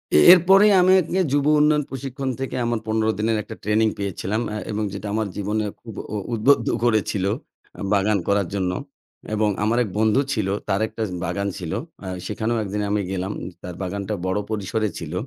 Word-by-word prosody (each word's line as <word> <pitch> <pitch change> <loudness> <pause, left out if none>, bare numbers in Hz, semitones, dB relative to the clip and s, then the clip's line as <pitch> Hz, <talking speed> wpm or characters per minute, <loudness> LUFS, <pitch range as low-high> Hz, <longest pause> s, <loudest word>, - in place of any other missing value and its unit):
এ - - +8 0.2
এরপরেই 195 +4 +6
আমি 185 - +5
একি 180 +3 -2
যুব 145 0 +2
উন্নয়ন 150 0 +4
প্রশিক্ষণ 135 0 -4
থেকে 135 - -3
আমার 120 -1 0
১৫ 110 0 +1
দিনের 110 +1 +1
একটা - - -9
ট্রেনিং 110 +2 +3
পেয়েছিলাম 100 +2 -2
আ - - -3 0.2
এবং 105 +1 -1
যেটা 100 +1 -5
আমার 110 0 0
জীবনে 105 +1 -1 0.2
খুব 115 -3 -9 0.2
উ - - 0 0.2
উদ্বুদ্ধ 115 +6 +3 0.2
করেছিল 110 -4 +1 0.7
বাগান 100 +1 +3
করার 100 -2 +2
জন্য। 95 -2 0 0.6
এবং 110 0 +2
আমার 115 +3 +2
এক 105 - -5
বন্ধু 110 +5 +3
ছিল 110 -5 -1 0.2
তার 100 +2 +1
একটা 115 - -8
উ - - -5
বাগান 100 +4 -2
ছিল। 90 -4 -5 0.3
আ - - -5 0.2
সেখানেও 110 +4 -1
১ 100 - -5
দিন 105 - -1
আমি 105 0 +1
গেলাম। 95 +1 -2 0.3
তার 90 -1 -6
বাগানটা 100 +3 -3
বড় 95 +2 0
পরিসরে 110 +1 -1
ছিল। 80 -1 -6
110 Hz, 185 wpm, -23 LUFS, 100-120 Hz, 0.7 s, এ